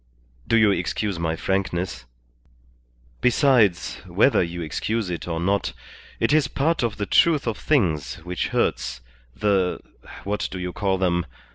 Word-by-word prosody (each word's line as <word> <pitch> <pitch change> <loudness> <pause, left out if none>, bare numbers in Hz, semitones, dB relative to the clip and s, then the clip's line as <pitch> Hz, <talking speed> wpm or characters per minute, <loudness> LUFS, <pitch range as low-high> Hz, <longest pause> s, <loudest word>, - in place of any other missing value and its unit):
Do 115 - +3
you 110 -2 +5
excuse 95 +1 -2
my 80 -1 -1
frankness? 90 -8 -2 1.2
Besides, 125 - +3
whether - - +3
you 85 0 -3
excuse 105 +6 -2
it 85 - -5
or 85 -1 -2
not, 100 +4 0 0.5
it - - +2
is 155 -4 +4
part 160 +4 0
of 115 -4 -1
the 105 - -2
truth 155 +6 +3
of 115 -2 -1
things 85 - 0
which 90 -1 -2
hurts - - -1 0.3
the 100 -3 +1 0.4
what 105 +1 -2
do 95 - -6
you 90 -1 -4
call 95 -2 0
them? 85 -2 0
95 Hz, 145 wpm, -23 LUFS, 85-110 Hz, 1.2 s, you